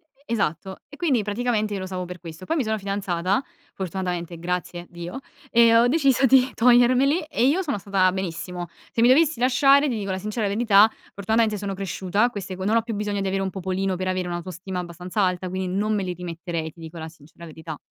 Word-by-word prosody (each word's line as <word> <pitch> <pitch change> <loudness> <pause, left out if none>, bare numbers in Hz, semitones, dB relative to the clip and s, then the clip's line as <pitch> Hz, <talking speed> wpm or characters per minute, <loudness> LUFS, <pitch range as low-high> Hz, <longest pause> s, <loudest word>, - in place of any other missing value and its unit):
E 280 - -30
e 235 - 0
esatto, 190 -1 -2
e 290 - -12
quindi 270 -11 +1
praticamente 215 0 -1
io 200 - -2
lo 185 - -4
usavo 185 -1 -4
per 180 0 -8
questo. 165 +1 -10
Poi 325 - -1
mi 275 - +1
sono 220 0 0
fidanzata 195 -1 -1 0.3
fortunatamente, 180 -2 -4
grazie 175 0 -4
Dio, 175 +9 -7 0.3
e 230 -1 +5
ho 235 +1 +6
deciso 270 -2 +3
di 260 0 +5
togliermeli 250 +6 +4
e 240 - +1
io 340 +7 +2
sono 290 - -2
stata 190 -1 +2
benissimo. 180 -1 -4 0.2
Se 230 - 0
mi 235 - +6
dovessi 305 +1 +4
lasciare, 275 +3 +4
ti 245 - -1
dico 200 -2 -3
la 185 - -2
sincera 210 +2 -2
verità, 210 0 +5 0.2
fortunatamente 215 +1 +1
sono 200 -1 -4
cresciuta, 195 +3 0
queste 195 -5 -6
co 190 - -4
non 215 +3 +2
ho 230 - +4
più 230 0 -5
bisogno 205 -1 -2
di 195 - -1
avere 195 0 -1
un 190 - -1
popolino 190 0 -2
per 185 +1 -2
avere 185 -1 -1
un'autostima 180 +1 -5
abbastanza 180 +3 -4
alta, 185 0 0
quindi, 185 0 -3
non 210 +2 0
me 200 - -1
li 180 -1 -3
rimetterei, 170 -2 -5
ti 170 - -21
dico 165 +1 -9
la 160 0 -6
sincera 160 +2 -14
verità. 160 -1 -8
195 Hz, 220 wpm, -24 LUFS, 180-230 Hz, 0.3 s, ho